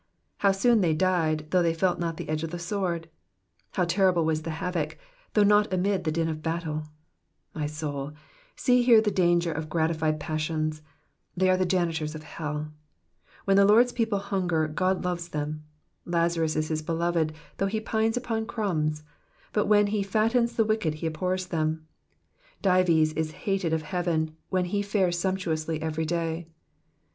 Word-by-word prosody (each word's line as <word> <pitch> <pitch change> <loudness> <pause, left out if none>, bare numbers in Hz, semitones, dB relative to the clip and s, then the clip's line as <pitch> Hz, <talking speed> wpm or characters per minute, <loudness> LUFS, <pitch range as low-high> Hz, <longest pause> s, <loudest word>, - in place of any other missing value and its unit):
How 200 - +4
soon 220 +3 +3
they 165 -4 +2
died, 155 -3 +1
though 185 - +4
they 165 -1 +1
felt 175 +1 +1
not 165 -2 -2
the - - -6
edge 155 0 -1
of 165 - -3
the 175 - -5
sword! 175 -2 -2 0.7
How 180 - +1
terrible 175 -1 +3
was 155 -1 0
the 160 - -6
havoc, 170 -3 -2 0.4
though 210 - +6
not 205 0 +4
amid 185 +1 0
the 155 - +1
din 165 +1 0
of 155 -1 -4
buttle! 160 -2 -3 0.7
My 150 -2 -2
soul, 150 -2 -4 0.4
see 250 -2 +3
here 240 -2 +7
the 215 -1 +1
danger 175 -2 +2
of 155 0 -4
gratified 160 -1 0
passions; 155 0 -2 0.6
they 185 +1 +4
are - - +4
the 185 -1 +1
janitors 165 -4 0
of 155 - -8
hell. 150 -1 -5 0.7
When 195 0 +4
the 200 - +7
Lord's 235 +5 +5
people 225 -4 0
hunger 185 -5 0
God 185 +5 0
loves 175 -1 -2
them; 150 0 -4 0.4
Lnzarus 170 -2 +1
is 155 0 -1
his 155 -1 -1
beloved, 165 0 0 0.3
though 195 - +1
he 215 +2 -1
pines 220 +1 0
upon 225 -3 -2
crumbs; 155 -10 -1 0.5
but 210 - +1
when 210 0 +5
he 205 0 0
fattens 225 +4 +1
the 225 - +3
wicked 215 -8 0
he 155 - -6
abhors 185 +4 -1
them; 160 -2 -2 0.8
Dives 175 -5 +4
is 160 -1 -2
hated 195 -4 0
of 160 -1 0
heaven 160 -2 -1
when 185 -1 +1
he 200 +3 -1
fares 195 -4 +1
sumptuously 165 -4 -1
every 160 0 -2
day. 165 0 -2
170 Hz, 170 wpm, -27 LUFS, 155-195 Hz, 0.8 s, here